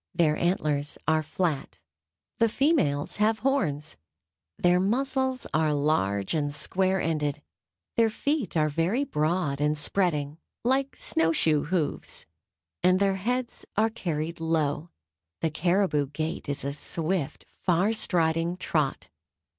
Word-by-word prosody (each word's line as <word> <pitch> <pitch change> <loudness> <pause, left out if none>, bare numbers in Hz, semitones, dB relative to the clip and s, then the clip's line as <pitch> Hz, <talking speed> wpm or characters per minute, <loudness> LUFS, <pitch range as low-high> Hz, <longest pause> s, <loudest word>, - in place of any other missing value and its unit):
Their 160 -3 +3
antlers 150 -5 0
are 160 0 +3
flat, 155 -2 -2 0.6
the 230 -1 +4
females 240 - +1
have 215 +1 +3
horns, 155 - 0 0.6
their 180 0 +3
muzzles 260 +5 0
are 155 -1 +2
large 100 -10 +1
and 145 -2 -1
square 190 +5 +1
ended, 150 -2 -1 0.5
their 230 -1 +5
feet 280 - -1
are 155 -1 +3
very 165 - 0
broad 155 - 0
and 150 +1 +1
spreading, 150 -3 0 0.2
like 265 +3 +1
snow 160 0 +1
shoe 155 -2 +2
hoofs, 165 -2 -2 0.6
and 185 +1 +4
their 195 -1 +2
heads 245 +5 -2
are 220 +1 +3
carried 165 -6 -3
low. 160 -1 0 0.5
The 160 - 0
caribou 175 -2 +1
gait 155 +2 -4
is 140 -1 -2
a 140 - -2
swift, 160 +1 -2
far 185 +4 +2
striding 170 -3 +1
trot. 145 - -1
165 Hz, 125 wpm, -27 LUFS, 150-195 Hz, 0.6 s, their